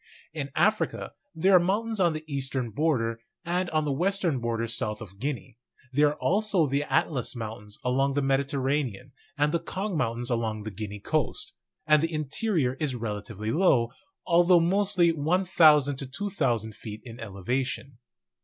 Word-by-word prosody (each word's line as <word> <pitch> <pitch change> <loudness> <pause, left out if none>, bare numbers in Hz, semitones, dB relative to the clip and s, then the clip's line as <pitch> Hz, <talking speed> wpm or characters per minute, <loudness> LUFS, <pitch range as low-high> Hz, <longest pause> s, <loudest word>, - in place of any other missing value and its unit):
In 145 -3 -4
Africa 215 +1 +1 0.2
there 185 +4 +4
are - - +9
mountains 210 +5 -1
on 175 -3 +3
the 155 0 -5
eastern 135 -4 -2
border, 115 -4 0 0.3
and 175 +1 0
on 155 -1 0
the 145 - 0
western 175 -1 +1
border 115 -1 -1
south 110 -1 -1
of 100 -3 -11
Guinea; 125 -3 -4 0.3
there 145 +2 +5
are 145 - -1
also 195 0 +2
the 140 0 0
Atlas 140 -3 0
Mountains 110 -2 -7
along 135 +2 +1
the 145 - +1
Mediterranean, 135 -3 0 0.3
and 145 +1 +2
the 170 - +1
Kong 195 +3 -4
Mountains 120 -4 -1
along 110 -2 -1
the 110 - -5
Guinea 105 +1 -6
coast; 160 - -2 0.3
and 155 -1 +5
the 165 +1 -1
interior 155 - 0
is 145 -5 -1
relatively 105 -2 -4
low, 130 -9 +3 0.3
although 175 +1 +5
mostly 185 0 +3
1,000 160 -3 +4
to 135 - -5
2,000 130 - -1
feet 105 0 -9
in 120 0 -10
elevation. 120 +5 -3
140 Hz, 155 wpm, -27 LUFS, 115-170 Hz, 0.3 s, are